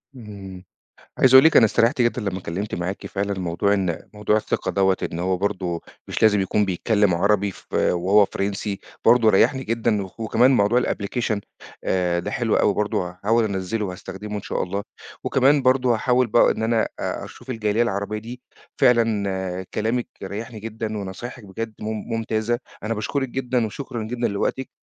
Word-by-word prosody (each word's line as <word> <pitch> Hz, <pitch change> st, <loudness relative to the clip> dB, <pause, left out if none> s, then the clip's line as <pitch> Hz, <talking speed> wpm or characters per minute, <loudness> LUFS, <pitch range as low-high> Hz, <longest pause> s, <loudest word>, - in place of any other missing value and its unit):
إمم، 100 Hz, -6 st, -10 dB, 0.6 s
عايز 130 Hz, 0 st, +5 dB
أقول 130 Hz, -, +10 dB
لِك 160 Hz, -, +5 dB
أنا 120 Hz, -, +8 dB
استريحت 120 Hz, +5 st, +2 dB
جدًا 120 Hz, +1 st, +1 dB
لمّا 95 Hz, -2 st, -2 dB
أتكلمت 95 Hz, +3 st, -4 dB
معاكِ 90 Hz, +3 st, -4 dB
فعلًا، 100 Hz, 0 st, -2 dB
موضوع 90 Hz, +3 st, +1 dB
إن 90 Hz, -4 st, -1 dB, 0.2 s
موضوع 105 Hz, 0 st, +1 dB
الثقة 110 Hz, -, -1 dB
دوّة 95 Hz, -1 st, +2 dB, 0.2 s
إن 85 Hz, -, -4 dB
هو 90 Hz, +1 st, 0 dB
برضو 90 Hz, -3 st, -2 dB, 0.3 s
مش -, -, -4 dB
لازم 105 Hz, -2 st, +5 dB
يكون 100 Hz, +2 st, +1 dB
بيتكلم 100 Hz, +1 st, +1 dB
عربي 100 Hz, +3 st, +2 dB
ف -, -, -16 dB
وهو 95 Hz, +4 st, +4 dB
فرنسي 100 Hz, 0 st, -3 dB, 0.2 s
برضو 115 Hz, -1 st, +6 dB
ريحني 125 Hz, +6 st, +3 dB
جدًا، 115 Hz, -2 st, 0 dB
و 95 Hz, -, -10 dB
وكمان 115 Hz, +3 st, +3 dB
موضوع 120 Hz, 0 st, +3 dB
الapplication 110 Hz, +1 st, -1 dB, 0.5 s
آآ، 90 Hz, -2 st, +1 dB
ده -, -, -5 dB
حلو 120 Hz, -4 st, 0 dB
أوي 100 Hz, -, +3 dB
برضو، 105 Hz, -2 st, 0 dB
هاحاول 100 Hz, +6 st, 0 dB
أنزّله 100 Hz, +2 st, -2 dB
وهاستخدمه 95 Hz, +3 st, -7 dB
إن 100 Hz, -, -5 dB
شاء -, -, -2 dB
الله، 100 Hz, +3 st, -3 dB, 0.4 s
وكمان 135 Hz, +1 st, +3 dB
برضو 130 Hz, -1 st, +3 dB
هاحاول 125 Hz, +2 st, +2 dB
بقى 115 Hz, +1 st, +4 dB
إن 110 Hz, -, -2 dB
أنا 115 Hz, 0 st, +2 dB
أ -, -, -4 dB
أشوف -, -, -11 dB
الجالية 110 Hz, -1 st, +1 dB
العربية 105 Hz, -1 st, -2 dB
دي، 120 Hz, +3 st, -9 dB, 0.4 s
فعلًا 100 Hz, -7 st, +1 dB
كلامِك 115 Hz, +3 st, -1 dB
ريّحني 110 Hz, +3 st, -6 dB
جدًا 110 Hz, -1 st, -4 dB
ونصايحِك 105 Hz, +4 st, -7 dB
بجد 110 Hz, +3 st, -5 dB
مم 105 Hz, -, -4 dB, 0.3 s
ممتازة، 115 Hz, +1 st, -1 dB, 0.2 s
أنا 110 Hz, +1 st, -1 dB
باشكرِك 135 Hz, +6 st, -2 dB
جدًا 125 Hz, -2 st, -1 dB
وشكرًا 120 Hz, +1 st, -6 dB
جدًا 120 Hz, +2 st, -1 dB
لوقتِك، 115 Hz, +6 st, -2 dB
105 Hz, 170 wpm, -23 LUFS, 95-120 Hz, 0.6 s, أقول